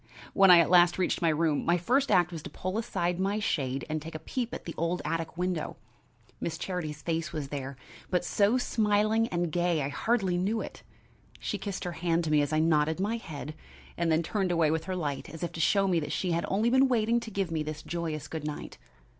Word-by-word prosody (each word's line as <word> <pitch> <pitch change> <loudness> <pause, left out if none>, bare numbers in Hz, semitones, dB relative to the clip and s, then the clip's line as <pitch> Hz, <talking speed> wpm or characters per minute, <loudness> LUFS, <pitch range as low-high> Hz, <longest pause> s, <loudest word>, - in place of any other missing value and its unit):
When 195 -1 +6
I 180 - +10
at 170 0 +4
last 175 -1 +6
reached 185 0 0
my 165 - +3
room, 155 -1 +1
my 175 +1 +3
first 260 +10 +1
act 180 -3 +4
was 165 -2 -6
to - - -8
pull 185 +4 -3
aside 175 -5 -1
my 195 +2 0
shade 135 -10 -1
and 155 0 -2
take 160 +1 -8
a 155 - -8
peep 245 -2 -2
at - - -7
the 165 - -5
old 170 +2 -1
attic 165 0 -3
window. 180 -3 -2 0.6
Miss 165 -1 -3
Charity's 155 -6 -4
face 165 -1 -2
was 145 -3 -4
there, 140 -1 -5 0.3
but 180 -1 0
so 205 +6 +3
smiling 215 -1 +2
and 175 -4 -1
gay 175 -2 +1
I 135 - -2
hardly 190 +3 0
knew 205 +5 0
it. - - -7 0.6
She - - -3
kissed 200 -3 -4
her 175 - -3
hand 170 0 0
to 155 - -2
me 150 -1 +5
as 145 +1 -1
I 155 - +1
nodded 155 0 +2
my 210 +4 0
head, 150 - -7 0.4
and 170 -1 0
then 160 +1 +3
turned 190 +1 -1
away 165 -3 +3
with 160 0 -1
her 185 - -3
light 145 -6 -3
as 165 +3 -8
if 170 - -2
to 170 - -8
show 195 +4 +3
me 175 -3 +2
she 180 - -1
had 170 0 0
only 215 +5 +1
been 260 +1 +5
waiting 235 -1 +2
to 230 - -7
give 195 -4 -2
me 160 -1 -1
this 155 0 -5
joyous 160 -3 -4
good 160 -1 -5
night. 150 -1 -6
175 Hz, 230 wpm, -29 LUFS, 155-195 Hz, 0.6 s, I